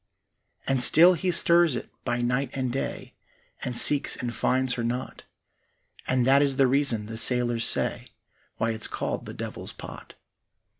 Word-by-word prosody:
And 135 -2 +1
still 170 +8 +8
he 180 +2 -3
stirs 170 -3 +3
it - - -6 0.2
by 120 -1 -2
night 125 +2 -1
and 130 -2 -3
day, 135 - -6 0.5
And 125 -2 -3
seeks 145 -1 +3
and 120 -1 -6
finds 130 0 0
her 120 - -4
not; 125 +2 -5 0.8
And 130 -1 0
that 135 +2 +4
is 140 -2 +1
the 135 0 +3
reason, 130 -5 0
the 110 +1 -8
sailors 120 0 +1
say, - - -2 0.5
Why 115 +1 -1
it's 110 -1 -3
called - - -5
the - - -8
Devil's - - -8
Pot. - - -12
130 Hz, 160 wpm, -25 LUFS, 120-140 Hz, 0.8 s, still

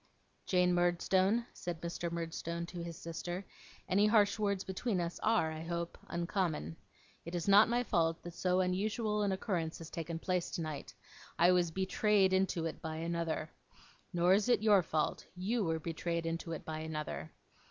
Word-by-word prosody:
'Jane 180 -1 +3
Murdstone,' 185 +5 +2
said 175 -2 -5
Mr. 170 0 -3
Murdstone 170 0 -3
to 175 0 -7
his 170 -2 -6
sister, 175 +3 -5 0.4
'any 200 +3 +4
harsh 210 -1 +4
words 200 -2 0
between 190 +1 -1
us 170 0 -3
are, 215 -8 +2
I 155 0 -6
hope, 170 +1 -3
uncommon. 170 - -1 0.5
It 170 +1 -6
is 170 +1 -2
not 205 +3 +7
my 240 +1 +2
fault 165 -6 +1
that 175 - -7
so 180 +2 +1
unusual 210 +4 0
an 200 -1 +1
occurrence 180 -4 -2
has 165 -1 -9
taken 165 0 -4
place 180 +1 -1
tonight. 155 -4 -5 0.4
I 175 +2 +6
was 175 -2 +3
betrayed 190 +2 +2
into 190 -3 +1
it 165 - -4
by 160 -1 -4
another. 165 -1 -2 0.6
Nor 175 0 +4
is 205 +4 +2
it 240 -3 +3
your 205 -3 +6
fault. 155 -2 -1
You 210 +6 0
were 160 -2 0
betrayed 170 +1 -2
into 165 0 -3
it 160 - -6
by 155 0 -4
another. 150 - -4
175 Hz, 170 wpm, -34 LUFS, 165-195 Hz, 0.6 s, not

